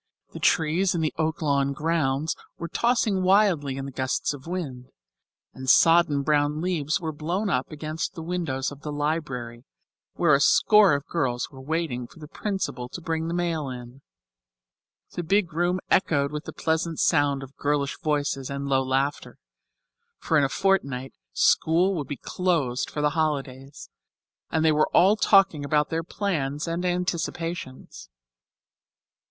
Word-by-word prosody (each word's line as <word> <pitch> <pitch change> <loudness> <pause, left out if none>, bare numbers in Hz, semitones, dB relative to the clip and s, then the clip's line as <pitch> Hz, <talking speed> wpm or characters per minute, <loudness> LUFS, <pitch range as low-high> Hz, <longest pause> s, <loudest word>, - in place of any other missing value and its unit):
The - - -7
trees 175 +4 +2
in 170 - 0
the 155 - -1
Oaklawn 145 -3 0
grounds 150 -1 0 0.2
were 170 - -5
tossing 225 0 +1
wildly 185 -8 +3
in 135 - -4
the 140 - -6
gusts 130 +2 -1
of 145 +1 -11
wind, 140 -9 -5 0.7
and 130 0 -5
sodden 165 -2 +5
brown 150 0 +1
leaves 160 -3 -1
were 160 -2 -3
blown 175 +7 -2
up 130 -1 -1
against 155 +4 -4
the 165 - -6
windows 160 -7 -2
of 145 0 -11
the 150 - -5
library, 145 -6 -3 0.5
where 170 -4 +3
a 140 - +5
score 205 +3 +5
of 140 +1 -4
girls 130 -7 -2
were 135 -2 -11
waiting 140 -4 -2
for - - -19
the 155 -2 -10
principal 190 - -4
to 175 - -7
bring 160 -1 -2
the 170 - -2
mail 165 -5 -1
in. 125 +1 -9 1.1
The - - -4
big 175 0 +1
room 175 +3 +1
echoed 140 -6 +2
with 150 0 -5
the - - -6
pleasant 160 0 -1
sound 145 -4 +2
of 135 +1 -12
girlish 145 -1 -1
voices 145 -3 -1
and 140 0 -4
low 135 -1 +2
laughter, 135 +3 -2 0.8
for 165 - -1
in 150 - +5
a 135 - +1
fortnight 140 -9 0 0.2
school 170 - +3
would 150 -6 -4
close 160 -9 0
for 150 - -5
the 150 0 +2
holidays, 140 -3 -3 0.6
and 160 0 0
they 160 - +5
were 155 0 +2
all 195 +4 +6
talking 195 -8 +4
about 150 +1 +1
their 165 0 0
plans 155 -6 -2
and 170 +2 -2
anticipations. 175 -5 -4
155 Hz, 155 wpm, -25 LUFS, 140-170 Hz, 1.1 s, all